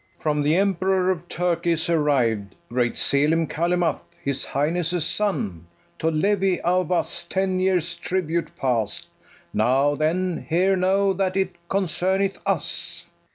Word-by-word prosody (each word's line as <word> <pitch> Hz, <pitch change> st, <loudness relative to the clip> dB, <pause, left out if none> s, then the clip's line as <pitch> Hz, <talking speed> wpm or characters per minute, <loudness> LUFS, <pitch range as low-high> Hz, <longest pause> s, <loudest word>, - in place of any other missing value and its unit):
]From 150 Hz, -1 st, 0 dB
the 150 Hz, +2 st, +2 dB
Emperor 190 Hz, -1 st, +2 dB
of 175 Hz, -1 st, -5 dB
Turkey 170 Hz, 0 st, 0 dB
is 165 Hz, 0 st, 0 dB
arriv'd 130 Hz, -11 st, +1 dB
Great 120 Hz, 0 st, 0 dB
Selim 155 Hz, +4 st, +3 dB
Calymath, 170 Hz, 0 st, 0 dB, 0.2 s
his 140 Hz, -1 st, -1 dB
highness' 165 Hz, +3 st, 0 dB
son, 105 Hz, -, -2 dB, 0.3 s
To 160 Hz, -, +1 dB
levy 190 Hz, +3 st, +1 dB
of 180 Hz, 0 st, +1 dB
us 175 Hz, -1 st, 0 dB
ten 190 Hz, +1 st, -1 dB
years' 180 Hz, -2 st, +1 dB
tribute 170 Hz, -2 st, -2 dB
past: 115 Hz, -6 st, -1 dB, 0.5 s
Now, 130 Hz, +6 st, +3 dB
then, 170 Hz, +4 st, -1 dB
here 185 Hz, +4 st, +3 dB
know 195 Hz, +1 st, +2 dB
that 190 Hz, 0 st, -1 dB
it 190 Hz, -1 st, +1 dB, 0.2 s
concerneth 190 Hz, +1 st, 0 dB
us. -, -, -1 dB
BARABAS. -, -, -32 dB
170 Hz, 135 wpm, -23 LUFS, 150-185 Hz, 0.5 s, Selim